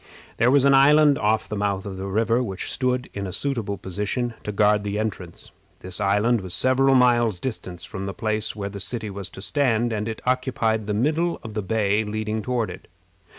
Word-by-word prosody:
There 120 - +4
was 140 0 +4
an 140 - +5
island 145 +1 +6
off 110 +1 +1
the 105 - -4
mouth 100 -1 -1
of 100 -2 -5
the 95 +1 -5
river 115 +4 +1
which 95 -6 -4
stood 125 -1 0
in 100 -1 -4
a - - -5
suitable 115 -5 -1
position 105 +7 -3
to 105 - -3
guard 105 0 +3
the 105 0 -3
entrance. 100 -5 -5 0.3
This 95 +2 -4
island 105 +3 +2
was 95 -2 -4
several 135 +1 +3
miles 120 -6 +3
distant 90 -8 -5
from 95 0 -6
the 100 - -4
place 110 +1 -2
where 100 -2 -4
the 100 0 -8
city 110 +1 -3
was 100 -1 -6
to 95 +2 -10
stand, 115 +3 +1
and 105 0 -2
it 110 -1 -4
occupied 125 -4 0
the 105 - -1
middle 160 +9 0
of 110 -2 -7
the 105 - -2
bay 105 +1 +1
leading 110 +1 -3
toward 120 0 -1
it. - - -11
110 Hz, 205 wpm, -24 LUFS, 100-125 Hz, 0.3 s, island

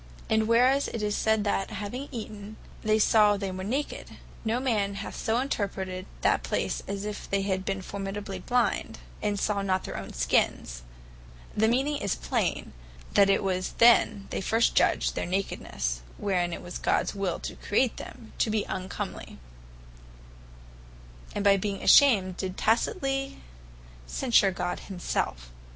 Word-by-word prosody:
And 220 0 +3
whereas 255 +4 +4
it 225 - -4
is 210 0 0
sayd, 220 -1 +2
that 200 -1 0
having 215 +7 -5
eaten, 215 -3 -7 0.2
they 215 0 +2
saw 210 -1 +5
they 195 -1 -3
were 185 0 -5
naked; 265 +9 -3 0.3
no 230 +2 0
man 210 -6 0
hath 200 - -6
so 225 +2 0
interpreted 190 -7 -3
that - - +3
place, - - -2
as 200 0 -4
if 210 -1 -6
they 195 0 +1
had 190 -1 -2
formerly 195 -1 -5
blind, 245 +6 0 0.2
as 205 -1 -1
saw 205 -2 0
not 190 -1 0
their - - -6
own - - -7
skins: - - 0 0.7
the 220 +1 +3
meaning 270 +5 +1
is 200 -7 -1
plain, - - -2 0.4
that 200 -1 +5
it 195 - +3
was 185 -1 -1
then 230 -4 +5
they - - -2
first 225 +4 +2
judged - - +2
their - - -3
nakednesse 65 - -2 0.2
(wherein 180 -3 0
it - - -6
was 175 - -6
Gods - - +1
will 195 -4 -2
to - - -5
create 235 +4 +1
them) 225 - -10
to - - +2
be 215 -1 +1
uncomely; 185 0 -5 2.0
and 205 - -1
by 200 -1 +5
being 195 0 -3
ashamed, 195 -10 +6
did 190 -1 -4
tacitely 270 +4 0 0.7
censure 235 -6 +3
God 180 -1 -3
himselfe. - - -3
205 Hz, 150 wpm, -28 LUFS, 190-225 Hz, 2.0 s, ashamed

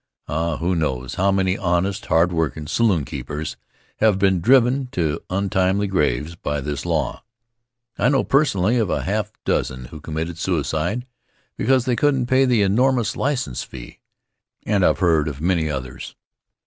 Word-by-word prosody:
Ah, 80 +1 -1
who 90 +2 0
knows 65 -6 -2
how 100 +1 +2
many 95 -1 +1
honest, 95 +1 -1
hard 85 +2 +3
workin' 80 -2 -1
saloonkeepers 80 - -1 0.4
have 110 -3 +3
been 95 -2 +2
driven 130 +4 +4
to 80 -10 -2
untimely 95 +1 +1
graves 75 -5 0
by 75 -3 -3
this 70 0 -4
law! - - -1 0.8
I 115 - +3
know 135 -2 +2
personally 125 -6 +2
of 110 -5 0
a - - -1
half 105 +2 -1
dozen 65 -1 -1
who 75 +5 -10
committed 80 +2 -4
suicide 85 - -1 0.5
because 130 -2 +2
they 125 -2 +1
couldn't 135 -2 +2
pay 130 +2 +3
the 120 -5 +3
enormous 120 +3 +2
license 125 - -1
fee, - - -10 0.7
and 100 -3 +2
I - - +6
have - - +1
heard 80 -4 +3
of 70 -3 -5
many 85 -1 +1
others. 65 -3 -6
90 Hz, 155 wpm, -21 LUFS, 80-110 Hz, 0.8 s, I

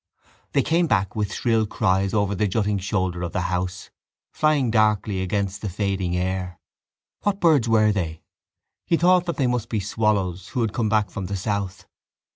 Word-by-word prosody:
They 140 - +3
came 170 +1 +2
back 100 -7 0
with 105 -2 -1
shrill 115 -2 +1
cries 95 -2 +1
over 100 -1 +1
the 105 +2 0
jutting 105 0 0
shoulder 95 -2 -1
of 85 - -4
the 90 - 0
house, 90 +1 -3 0.4
flying 150 -6 +2
darkly 105 -3 +2
against 100 +1 -2
the 105 - -3
fading 95 -2 -1
air. 90 -1 -3 0.6
What 200 -1 0
birds 150 - +3
were 110 -1 +4
they? 85 -6 -3 0.6
He 170 - +3
thought 180 +1 +4
that 170 - -2
they 135 - +1
must 125 -2 -1
be 110 - -1
swallows 100 -3 -1
who 125 - -2
had 110 -2 -1
come 110 -3 0
back 105 -1 +1
from 100 -4 -5
the 100 +1 -3
south. 100 0 -3
105 Hz, 180 wpm, -23 LUFS, 95-115 Hz, 0.6 s, were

